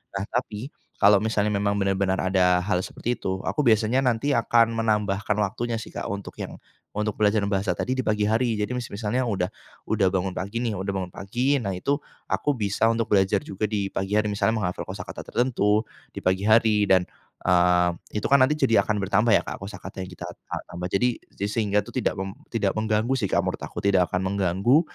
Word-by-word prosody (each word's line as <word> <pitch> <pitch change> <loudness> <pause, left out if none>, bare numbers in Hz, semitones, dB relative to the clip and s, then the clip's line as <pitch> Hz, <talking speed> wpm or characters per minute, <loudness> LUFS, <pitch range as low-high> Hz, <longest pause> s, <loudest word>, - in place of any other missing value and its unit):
Nah, 95 - -1
tapi 125 +2 -3 0.3
kalau 100 0 +6
misalnya 105 -1 +1
memang 100 0 +1
benar-benar 95 -1 +1
ada 90 -1 +3
hal 90 -2 +1
seperti 120 +1 -3
itu 95 0 -2
aku 150 - 0
biasanya 115 +2 +3
nanti 125 +3 +1
akan 115 0 +3
menambahkan 105 -2 0
waktunya 115 +3 -1
sih, 110 - -8
Kak, - - -4
untuk 100 -2 -5
yang - - -5 0.3
untuk 105 0 -2
belajar 105 -1 +3
bahasa 100 -1 0
tadi 130 - -1
di 130 - -1
pagi 105 -3 0
hari. 115 +1 +1
Jadi 105 +4 -2
masih 125 -2 -4
misalnya 110 +4 -1
udah 95 -4 0 0.4
udah 100 -3 +2
bangun 95 0 -1
pagi 100 +5 -4
nih, 115 -3 -1
udah 95 +1 -4
bangun 95 -2 -3
pagi. 125 +8 0
Nah, 100 - -3
itu 140 +9 0 0.3
aku 150 - 0
bisa 105 +2 +1
untuk 115 -1 +1
belajar 95 0 +3
juga 100 +2 -3
di 100 -2 -2
pagi 95 +2 -1
hari. 105 - +2
Misalnya 110 +2 +1
menghafal 90 -4 -3
kosakata - - -6
tertentu 110 -3 +1 0.2
di - - -16
pagi 95 +3 +1
hari 110 -2 +4
dan, 95 -2 +5 0.4
eee, 90 0 +4 0.3
itu - - -3
kan 140 -1 +5
nanti 150 +4 +4
jadi 130 -6 +4
akan 105 - -1
bertambah 105 +4 +2
ya, - - -4
Kak, - - -6
kosakata 95 -1 -7
yang 95 - -6
kita 90 - -8
ta - - -7
tambah. 90 +1 -6
Jadi 125 +7 +2 0.3
jadi 100 - -2
sehingga 105 -2 +1
itu - - -11
tidak - - -1
meng 95 0 -4 0.2
tidak 105 -4 0
mengganggu 110 +3 0
sih, 110 -8 -1
Kak, - - +1
menurut - - -3
aku - - -8
tidak 95 -3 +3
akan 90 +1 -1
mengganggu. 100 - +3
105 Hz, 205 wpm, -25 LUFS, 95-115 Hz, 0.4 s, kalau